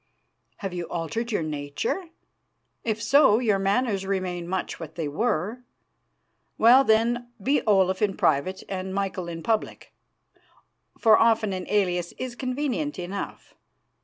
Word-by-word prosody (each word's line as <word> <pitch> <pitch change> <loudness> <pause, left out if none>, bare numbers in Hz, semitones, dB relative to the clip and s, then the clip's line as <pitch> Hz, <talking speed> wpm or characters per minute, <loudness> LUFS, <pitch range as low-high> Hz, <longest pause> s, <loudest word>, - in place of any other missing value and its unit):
"Have 195 -4 -5
you 175 -1 -3
altered 225 +9 -3
your 205 - 0
nature? 150 - -3 0.8
If 220 -1 -1
so, 270 -2 +5
your 215 -5 +1
manners 200 0 +1
remain 185 -3 -2
much 185 +1 -3
what 160 -1 -8
they 160 -3 -2
were. 210 - -1 1.0
Well, 245 +4 +7
then, 240 +1 +2
be 275 +8 +1
Olaf 190 -2 +3
in 200 -3 +1
private 160 +6 +1
and 190 0 -4
Michael 195 -3 -2
in 165 -1 -6
public, 220 -2 -2 1.0
for 220 -2 +5
often 225 -3 +3
an 185 -1 -5
alias 180 -4 0
is 255 -1 -5
convenient 280 +2 -2
enough. 185 +2 -6
200 Hz, 135 wpm, -25 LUFS, 180-230 Hz, 1.0 s, Well